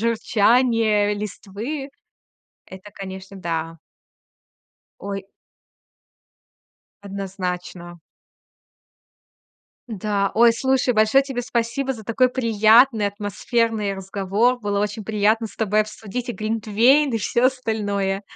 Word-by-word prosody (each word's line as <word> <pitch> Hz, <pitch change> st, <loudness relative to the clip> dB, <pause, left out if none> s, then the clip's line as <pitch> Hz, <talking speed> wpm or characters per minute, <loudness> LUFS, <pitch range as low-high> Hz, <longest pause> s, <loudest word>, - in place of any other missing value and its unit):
журчание 225 Hz, -1 st, +2 dB
листвы 210 Hz, +7 st, -6 dB, 0.8 s
это, 190 Hz, +2 st, -12 dB
конечно, 190 Hz, 0 st, -8 dB
да. 165 Hz, -2 st, -4 dB, 1.2 s
Ой. 195 Hz, 0 st, -6 dB, 1.8 s
Однозначно. 180 Hz, -3 st, -6 dB, 1.9 s
Да. 205 Hz, -2 st, -1 dB
Ой, 235 Hz, +1 st, +6 dB
слушай, 260 Hz, +1 st, +1 dB
большое 220 Hz, +5 st, +4 dB
тебе 265 Hz, -3 st, -4 dB
спасибо 240 Hz, +3 st, -2 dB
за 220 Hz, -3 st, -11 dB
такой 235 Hz, +4 st, +2 dB
приятный, 225 Hz, -1 st, +4 dB
атмосферный 210 Hz, +1 st, -1 dB
разговор. 195 Hz, +5 st, 0 dB
Было 205 Hz, -2 st, -1 dB
очень 210 Hz, 0 st, -3 dB
приятно 220 Hz, +2 st, +1 dB
с -, -, -17 dB
тобой 215 Hz, -1 st, +1 dB
обсудить 215 Hz, +3 st, -6 dB
и 240 Hz, -, -3 dB
глинтвейн, 225 Hz, +6 st, +2 dB
и -, -, +1 dB
всё 235 Hz, +4 st, +1 dB
остальное. 205 Hz, -6 st, -1 dB
215 Hz, 95 wpm, -22 LUFS, 200-235 Hz, 1.9 s, Ой